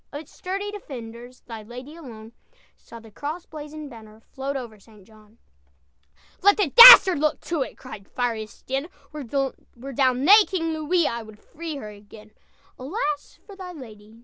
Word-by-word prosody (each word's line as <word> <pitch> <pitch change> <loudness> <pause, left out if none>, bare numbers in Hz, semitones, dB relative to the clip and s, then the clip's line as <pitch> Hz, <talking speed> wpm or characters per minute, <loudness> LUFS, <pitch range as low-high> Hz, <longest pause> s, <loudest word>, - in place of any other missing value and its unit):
"Of 290 - -7
its 310 - -19
sturdy 395 +3 -5
defenders, 245 - -11
Thy 225 -2 -10
lady 250 +7 -11
alone 230 -9 -12 0.4
Saw 230 - -14
the 225 -1 -17
cross 300 - -7
blazoned 300 -1 -10
banner 220 -2 -14
Float 275 +1 -5
over 230 -5 -9
St. 210 -1 -20
John." 215 +1 -22 1.0
"Let 405 +2 +4
the 390 -9 0
dastard 470 -9 +10
look 305 +1 0
to 335 -4 -4
it!" - - -5
Cried 210 -6 -12
fiery 240 -3 -3
Estienne, 270 +7 -6 0.2
"Were 305 -1 -8
D'Aulnay 270 - +1
King 330 -4 -3
Louis, 315 +1 0
I'd 220 -2 -7
free 320 +6 -9
her 240 -7 -8
again!" 210 +1 -16 0.5
"Alas 295 - -5
for 400 - -13
thy 370 -2 -10
lady! 220 -6 -14
270 Hz, 155 wpm, -23 LUFS, 225-315 Hz, 1.0 s, dastard